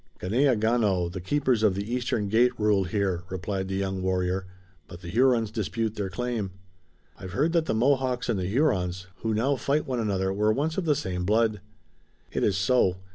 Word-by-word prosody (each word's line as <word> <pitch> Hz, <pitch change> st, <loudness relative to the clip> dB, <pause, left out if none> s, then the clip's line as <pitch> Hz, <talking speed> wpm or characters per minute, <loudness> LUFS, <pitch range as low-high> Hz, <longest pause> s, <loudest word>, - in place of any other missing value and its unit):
"Ganeagaono, 110 Hz, -5 st, +2 dB
the 95 Hz, 0 st, -6 dB
Keepers 130 Hz, +2 st, +1 dB
of 105 Hz, -4 st, +3 dB
the 100 Hz, +4 st, -4 dB
Eastern 120 Hz, -4 st, -1 dB
Gate, 120 Hz, +4 st, +2 dB
rule 105 Hz, -2 st, +2 dB
here," 95 Hz, -2 st, -1 dB
replied 95 Hz, +1 st, -3 dB
the 95 Hz, -, -3 dB
young 95 Hz, -1 st, -2 dB
warrior, 95 Hz, 0 st, -1 dB, 0.4 s
"but 85 Hz, -1 st, -11 dB
the 85 Hz, -, -8 dB
Hurons 115 Hz, 0 st, +3 dB
dispute 110 Hz, 0 st, -2 dB
their 100 Hz, -3 st, -3 dB
claim." 115 Hz, +1 st, -3 dB, 0.7 s
"I've 95 Hz, -2 st, -8 dB
heard 155 Hz, -, +1 dB
that 165 Hz, -2 st, +2 dB
the -, -, 0 dB
Mohawks 130 Hz, +1 st, +1 dB
and 110 Hz, -5 st, 0 dB
the 90 Hz, -, -2 dB
Hurons, 95 Hz, -, 0 dB
who 110 Hz, -1 st, -2 dB
now 135 Hz, +6 st, +1 dB
fight 145 Hz, +4 st, 0 dB
one 125 Hz, -2 st, -2 dB
another, 95 Hz, -3 st, 0 dB
were 105 Hz, +2 st, +2 dB
once 150 Hz, +7 st, -1 dB
of 190 Hz, -, -2 dB
the 150 Hz, -2 st, +3 dB
same 90 Hz, -6 st, -3 dB
blood." 110 Hz, +1 st, +1 dB, 0.7 s
"It -, -, -1 dB
is 95 Hz, -3 st, +2 dB
so. 95 Hz, -2 st, +2 dB
105 Hz, 185 wpm, -26 LUFS, 95-125 Hz, 0.7 s, of